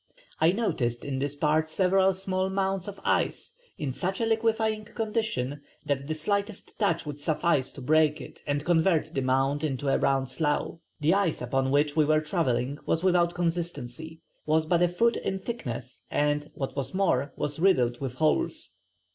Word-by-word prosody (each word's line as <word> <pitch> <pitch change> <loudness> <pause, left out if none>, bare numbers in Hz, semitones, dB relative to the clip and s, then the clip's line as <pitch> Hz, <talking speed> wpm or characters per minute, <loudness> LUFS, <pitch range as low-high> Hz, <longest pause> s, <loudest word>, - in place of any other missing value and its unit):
I 160 +2 +5
noticed 125 - -1
in 135 -2 -2
this 140 +1 -2
part 155 +2 +1
several 190 +3 +3
small 185 0 -1
mounds 190 -1 -1
of 200 -1 -7
ice - - 0 0.2
in 140 -4 -3
such 190 +7 -2
a 230 - +1
liquefying 220 -1 +1
condition 210 - -2 0.2
that 140 -1 -1
the 155 - -2
slightest 200 +5 -3
touch 175 -7 +1
would 145 -1 -6
suffice 155 -2 +1
to - - -9
break 155 +2 +3
it 130 - -11
and 145 +1 -1
convert 165 -2 +2
the 135 - 0
mound 135 +3 +1
into 140 -2 -1
a - - +2
round 135 -1 +1
slough. 150 +3 -1 0.2
The 155 +4 +4
ice 195 -5 +1
upon 130 +2 0
which 145 +1 +2
we 155 - +5
were 155 +1 +4
travelling 145 -4 -1
was 165 - +1
without 175 -2 +3
consistency, 165 -3 -3 0.2
was 155 +1 +2
but 170 +1 +2
a 175 - +5
foot 230 +7 +2
in 190 - -2
thickness, 135 - -6
and 145 0 0
what 135 -1 -4
was 140 +3 -3
more 145 -8 +1
was 145 +1 -3
riddled 125 -10 +3
with 130 -2 -4
holes.... 155 +2 0
155 Hz, 175 wpm, -27 LUFS, 140-190 Hz, 0.2 s, I